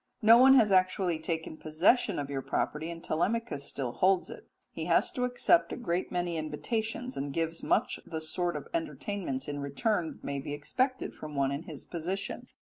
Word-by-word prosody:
No 230 +2 +8
one 265 +1 +8
has 220 -6 +5
actually 185 -2 +2
taken 160 -1 -3
possession 175 +7 +2
of 145 - -2
your 140 -1 -3
property, 155 +4 -2
and 170 0 -7
Telemachus 175 -3 -1
still 130 -4 -3
holds 185 +6 +2
it. - - -11 0.2
He - - -5
has - - +3
to 250 -2 -1
accept 250 +7 +3
a - - -4
great 180 -7 -2
many 175 -1 -1
invitations, 220 +11 -3
and 140 +1 -3
gives 165 +2 -2
much 230 - +1
the 160 - -5
sort 175 +2 -1
of - - -5
entertainments 200 - -3
in 145 -1 -3
return 165 - -1
that - - -20
may 140 0 -3
be 140 +1 -5
expected 255 - -1
from 150 -1 -8
one 135 -1 +1
in 140 +4 -4
his 155 -5 -9
position. 185 +4 -4
170 Hz, 190 wpm, -30 LUFS, 150-220 Hz, 0.2 s, No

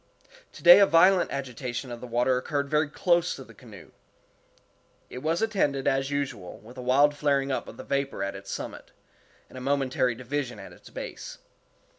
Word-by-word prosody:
Today 175 +2 +8
a 200 - +6
violent 180 +2 +5
agitation 125 -1 -5
of 120 - -7
the 125 - -7
water 120 +2 +1
occurred 140 +2 -2
very 150 0 +2
close 175 +3 +1
to 135 - -9
the 115 - -16
canoe. 105 -5 -14 1.2
It 125 - -6
was 160 +8 -1
attended, 145 -11 0
as 135 0 +1
usual, 130 -11 -4
with 115 +5 -13
a - - -5
wild 140 +4 +3
flaring 140 -2 +1
up 130 - -2
of - - -11
the - - -8
vapor 140 -7 -2
at 100 0 -4
its 100 0 -9
summit, - - -7 0.6
and 130 - -10
a - - -10
momentary 130 -2 0
division 130 +1 -4
at - - -11
its - - -16
base. - - -8
135 Hz, 180 wpm, -27 LUFS, 125-145 Hz, 1.2 s, Today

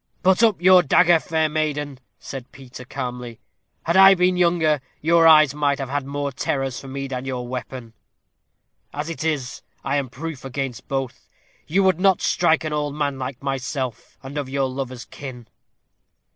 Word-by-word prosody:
"Put 190 +2 +4
up 220 -6 +3
your 185 +1 +7
dagger, 175 +2 +4
fair 160 -1 0
maiden," 150 -3 -2 0.2
said 135 -2 -9
Peter, 130 -2 -11
calmly. 125 -3 -6 0.4
"Had 170 - 0
I 195 0 +8
been 180 0 +2
younger, 170 -5 +2 0.2
your 165 +1 +4
eyes 155 -3 +7
might 145 -1 0
have 135 -2 -5
had 145 -1 -2
more 140 0 -3
terrors 135 0 -2
for 135 - -11
me 135 +1 -5
than 130 -1 -5
your 125 -2 -4
weapon; 125 -2 -7 1.0
as 150 +3 -4
it 165 - -6
is, 150 -6 -2 0.2
I 135 +1 0
am 135 -3 -2
proof 145 +1 -7
against 135 -2 -5
both. 135 -2 -4 0.4
You 195 +5 +2
would 185 -3 +2
not 190 -1 +3
strike 165 -2 +2
an 155 -1 -3
old 145 -1 -2
man 145 -3 -2
like 130 0 -6
myself, 130 -3 -4
and 140 +2 -5
of 140 -2 -5
your 135 0 0
lover's 130 -2 -6
kin?" 130 -4 -9
140 Hz, 170 wpm, -22 LUFS, 130-160 Hz, 1.0 s, I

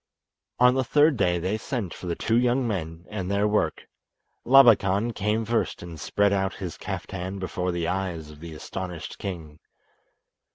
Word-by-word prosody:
On 125 0 +6
the 130 0 +1
third 145 +4 +4
day 90 -6 +2
they 95 +5 -2
sent 110 -7 -3
for 90 - -8
the 85 - -1
two 115 - 0
young 125 +1 +2
men 85 -5 -4
and 95 -4 -3
their 100 +1 +2
work. 105 -7 0 0.6
Labakan 115 -4 +5
came 105 +2 0
first 115 -4 -1
and 85 -2 -8
spread 100 +6 +1
out 95 0 0
his 90 -4 -6
kaftan 95 +1 -5
before 90 -1 -2
the 85 -1 -2
eyes 90 -5 -3
of 75 - -14
the 80 -1 -9
astonished 90 +1 -6
king. 80 -5 -6
95 Hz, 165 wpm, -26 LUFS, 85-110 Hz, 0.6 s, On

